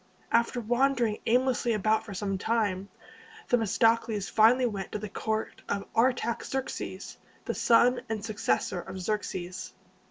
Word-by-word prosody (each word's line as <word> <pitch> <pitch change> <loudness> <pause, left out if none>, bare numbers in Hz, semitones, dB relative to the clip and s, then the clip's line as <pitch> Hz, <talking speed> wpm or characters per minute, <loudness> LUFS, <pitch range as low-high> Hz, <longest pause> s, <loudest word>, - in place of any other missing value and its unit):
After 235 +1 +2
wandering 240 -1 +1
aimlessly 250 0 +2
about 215 +1 +1
for 200 - -7
some 195 0 -2
time, 205 -3 0 0.6
Themistocles 225 -2 +2
finally 235 +4 +5
went 200 -5 -3
to - - -1
the 210 0 -5
court 220 +2 -3
of 200 0 -2
Ar 245 +4 +5
tax 235 -2 -4
erx´es, 265 -1 -4 0.3
the - - -1
son 245 +2 +4
and 220 -1 -3
successor 210 -4 -1
of 190 - -8
Xerxes. 185 -2 -4
220 Hz, 135 wpm, -28 LUFS, 200-235 Hz, 0.6 s, finally